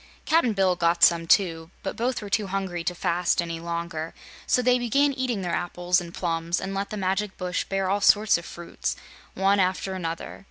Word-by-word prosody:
Cap'n 315 Hz, -8 st, +3 dB
Bill 190 Hz, -2 st, +2 dB
got 170 Hz, -1 st, +1 dB
some 165 Hz, 0 st, +5 dB
too, 165 Hz, -4 st, +2 dB
but 190 Hz, -, -3 dB
both 240 Hz, -1 st, -1 dB
were 205 Hz, -, -7 dB
too 210 Hz, -1 st, +1 dB
hungry 190 Hz, -3 st, -3 dB
to 180 Hz, -, -1 dB
fast 175 Hz, +1 st, 0 dB
any 165 Hz, -1 st, -2 dB
longer, 170 Hz, -1 st, -4 dB, 0.3 s
so 250 Hz, -, +2 dB
they 250 Hz, 0 st, +4 dB
began 275 Hz, +4 st, +2 dB
eating 250 Hz, -6 st, -2 dB
their 175 Hz, -, -2 dB
apples 175 Hz, +1 st, 0 dB
and 170 Hz, -1 st, -8 dB
plums 170 Hz, 0 st, -1 dB
and 195 Hz, -, -4 dB
let 200 Hz, +1 st, -2 dB
the 215 Hz, -, -5 dB
magic 195 Hz, +1 st, -1 dB
bush 180 Hz, -1 st, -2 dB
bear 195 Hz, -1 st, -1 dB
all 200 Hz, +2 st, 0 dB
sorts 210 Hz, +1 st, +5 dB
of 170 Hz, -, -2 dB
fruits, 170 Hz, 0 st, -5 dB, 0.4 s
one 195 Hz, +1 st, +3 dB
after 190 Hz, +1 st, 0 dB
another. 165 Hz, -3 st, -5 dB
185 Hz, 200 wpm, -25 LUFS, 170-205 Hz, 0.4 s, some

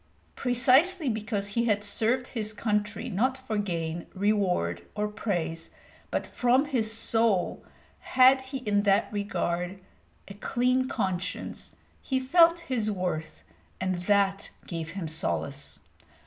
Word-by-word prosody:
Precisely 270 Hz, +7 st, +3 dB
because 215 Hz, -2 st, -2 dB
he 235 Hz, +3 st, 0 dB
had 205 Hz, -3 st, +1 dB
served 230 Hz, +5 st, 0 dB
his 215 Hz, -3 st, -3 dB
country 210 Hz, +2 st, -1 dB
not 250 Hz, +5 st, 0 dB
for 260 Hz, -4 st, -5 dB
gain, 170 Hz, -4 st, -3 dB
reward, 185 Hz, -, +1 dB
or 210 Hz, 0 st, 0 dB
praise, 175 Hz, -6 st, -3 dB, 0.4 s
but -, -, -1 dB
from 250 Hz, +3 st, +2 dB
his 240 Hz, -7 st, 0 dB
soul, 225 Hz, -4 st, +1 dB, 0.4 s
had 260 Hz, +1 st, +5 dB
he 265 Hz, +1 st, -6 dB
in 205 Hz, -1 st, +3 dB
that 200 Hz, -1 st, +3 dB
regard 190 Hz, -3 st, -2 dB, 0.5 s
a 200 Hz, -, -8 dB
clean 250 Hz, +5 st, 0 dB
conscience, 190 Hz, -7 st, -3 dB, 0.3 s
he 265 Hz, -1 st, -1 dB
felt 335 Hz, +5 st, +5 dB
his 240 Hz, -9 st, -1 dB
worth, 175 Hz, -, -3 dB, 0.4 s
and 185 Hz, 0 st, 0 dB
that 200 Hz, -1 st, +2 dB, 0.2 s
gave 165 Hz, -1 st, -5 dB
him 175 Hz, -4 st, -3 dB
solace. 145 Hz, -3 st, -2 dB
210 Hz, 125 wpm, -28 LUFS, 185-250 Hz, 0.5 s, had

